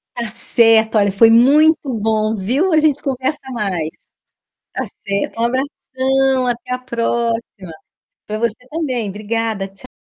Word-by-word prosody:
Tá 235 -2 -4
certo! 225 -1 +3
Olha, 200 -1 +3
foi 225 +4 +5
muito 280 +4 +4
bom, 215 0 0
viu. 255 - 0
A 310 - +5
gente 300 -2 +2
conversa 270 +2 -2
mais. 185 -9 -2 0.8
Tá - - -2 0.2
certo, 200 +3 -2
um - - +1
abração 265 0 0
até 245 +1 -3
a 250 - -2
próxima! 230 -7 -3 0.5
Pra 215 0 -4
você 235 +2 -3
também. 260 -9 -2
Obrigada, 215 0 -3
tcha 195 +6 -15
235 Hz, 140 wpm, -18 LUFS, 215-260 Hz, 0.8 s, foi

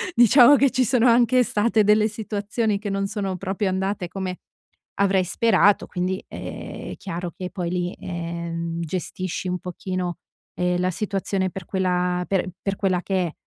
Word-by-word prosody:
Diciamo 245 +4 +8
che 275 -1 +3
ci 255 0 +2
sono 240 +1 +3
anche 245 +1 +5
state 220 -1 +2
delle 210 +1 +4
situazioni 210 0 -2
che 205 0 -4
non 195 0 -1
sono 195 -2 -3
proprio 195 +2 -2
andate 190 0 -2
come 185 0 -4 0.6
avrei 195 -1 +3
sperato, 205 +2 +3
quindi, 185 +1 -2
ehm, - - -7
è - - -6
chiaro 175 -3 -5
che 180 -1 -5
poi 175 -3 -3
lì, 180 0 -1
ehm, 170 -1 -4
gestisci 185 +2 -4
un 180 0 -1
pochino, 180 0 -4 0.4
ehm, 180 0 0
la 180 +1 +1
situazione 195 0 -1
per 190 -1 -7
quella 180 -1 0
per 190 -2 0
per 195 -1 -2
quella 185 -2 0
che 185 -1 0
è. 165 - -8
190 Hz, 165 wpm, -23 LUFS, 180-210 Hz, 0.6 s, Diciamo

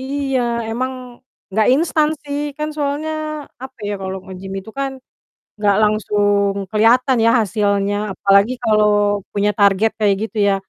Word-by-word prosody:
Iya 270 -1 -1 0.3
emang 255 +3 -2 0.6
nggak 215 +2 +2
instan 310 0 +2
sih, 285 0 -4 0.2
kan 300 0 -2
soalnya 290 +2 -2 0.5
apa 265 -1 -11
ya, 205 - -2
kalau 190 0 -4
nge-gym 190 0 -9
itu 220 - -12
kan 275 -1 -1 0.7
nggak 205 -1 +2
langsung 205 -1 +2 0.2
kelihatan 240 +5 +3
ya 230 - +5
hasilnya, 200 -1 0 0.2
apalagi 200 +5 +3
kalau 215 -2 +3 0.5
punya 205 +1 +1
target 200 +2 +4
kayak 205 -2 +3
gitu 225 +1 -6
ya. 195 - +3
215 Hz, 140 wpm, -18 LUFS, 200-265 Hz, 0.7 s, ya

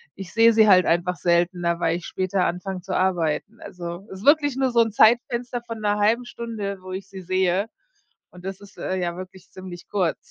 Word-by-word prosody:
Ich 190 -2 -9
sehe 230 0 +6
sie 220 -1 +5
halt 185 -3 +6
einfach 175 +2 +1
seltener, 175 0 +1
weil 165 -1 +1
ich 175 - -10
später 185 0 -1
anfange 180 +1 -3
zu - - -4
arbeiten. 185 +3 0
Also 175 +1 -7
ist 190 +2 -9
wirklich 290 -2 +4
nur 265 0 +1
so 235 -1 +4
'n 225 -1 +1
Zeitfenster 240 +2 +2
von 230 -1 -6
'ner 210 -1 0
halben 225 +4 +2
Stunde, 220 -5 -5
wo 185 0 -9
ich 190 +1 -6
sie 195 -1 -9
sehe 185 +2 +1 0.6
und 180 0 -14
das 190 0 -5
ist 200 - -15
äh, 190 - -3
ja 175 -2 -2
wirklich 185 0 -10
ziemlich 185 -2 -10
kurz. 185 -5 0
190 Hz, 205 wpm, -23 LUFS, 180-220 Hz, 0.6 s, sehe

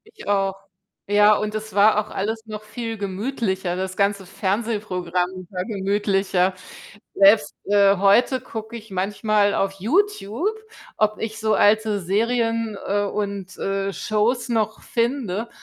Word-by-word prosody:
Ich - - -12
auch. 195 -1 +1 0.5
Ja, 210 +1 +6
und 215 0 -3
es 215 0 -5
war 210 +2 +5
auch - - -15
alles 220 +3 -3
noch 215 -1 -7
viel 225 +1 -5
gemütlicher, 195 -2 -2
das 185 0 -3
ganze 200 -1 0
Fernsehprogramm 185 -3 -2
war 180 -2 -3
gemütlicher. 195 -2 0 0.6
Selbst, 200 +2 +5
äh, 200 -1 +4
heute 220 +7 +4
gucke 225 -2 -7
ich 220 -2 -13
manchmal 205 +2 +1
auf 195 0 0
YouTube, 335 - 0 0.5
ob 215 0 +1
ich 220 -1 -4
so 215 0 +1
alte 215 0 +3
Serien, 225 +3 0
äh, 205 +1 +1
und, 200 -2 -4
äh, 195 0 -2
Shows 230 +6 0
noch 220 -2 -1
finde, 235 -3 -1
205 Hz, 135 wpm, -22 LUFS, 195-220 Hz, 0.6 s, Ja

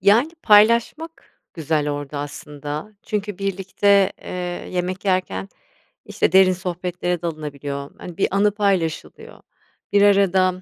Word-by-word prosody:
Yani, 215 - +4
paylaşmak 235 +10 +2
güzel 155 -2 -1
orada 145 0 -5
aslında, 145 +6 -7
çünkü 205 -2 -4
birlikte, 195 0 +2
eee, - - -9 0.4
yemek 180 +1 -3
yerken, 180 - -1 0.6
işte, - - -1
derin 190 0 +6
sohbetlere 180 -1 -3
dalınabiliyor, 145 -3 -5
hani, 175 -2 -9
bir - - +1
anı 205 0 +3
paylaşılıyor. 195 -6 -2 0.5
Bir 200 - +4
arada, 195 -2 +4
185 Hz, 115 wpm, -21 LUFS, 155-200 Hz, 0.6 s, derin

